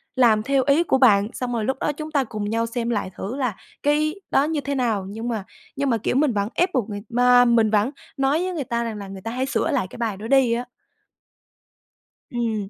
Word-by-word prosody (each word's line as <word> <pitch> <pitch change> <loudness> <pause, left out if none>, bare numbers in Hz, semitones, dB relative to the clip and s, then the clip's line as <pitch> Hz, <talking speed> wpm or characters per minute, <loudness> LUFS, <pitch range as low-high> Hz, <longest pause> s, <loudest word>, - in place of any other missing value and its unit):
làm 225 -5 +4
theo 275 0 +2
ý 290 +4 +4
của 295 - +2
bạn 210 -6 +5
xong 250 -1 -3
rồi 225 -2 -1
lúc 265 +2 -1
đó - - 0
chúng 310 +1 -7
ta 280 -3 +2
cùng 210 -4 -4
nhau 230 +1 0
xem 235 0 -3
lại 205 -5 -2
thử 205 +7 -5
là 250 -8 -1 0.3
cái 305 +2 +2 0.2
đó 275 - +4
như 305 -1 -1
thế 280 0 -3
nào." 225 -7 0
Nhưng 225 +4 -5
mà 220 -4 -2 0.3
nhưng 280 0 0
mà, 230 - +2
kiểu, 225 - -2
mình 275 -2 +3
vẫn 205 0 -1
ép 360 +1 +1
buộc 235 -5 0
người 205 -1 -5
mà 245 +1 +5
mình 230 -2 +4
vẫn 215 +4 +2 0.3
nói 275 +5 +2
với 370 - -2
người 315 -5 -2
ta 235 0 -1
rằng 225 -2 -4
là 200 -1 -7
người 195 0 -9
ta 225 - -5
hãy 255 +2 -1
sửa 265 - 0
lại 185 - 0
cái - - -11
bài 225 -4 -2
đó 215 +3 -7
đi 265 -2 +4
á. 240 +1 -2 1.7
Ừm. 225 -5 -2
240 Hz, 245 wpm, -23 LUFS, 215-275 Hz, 1.7 s, bạn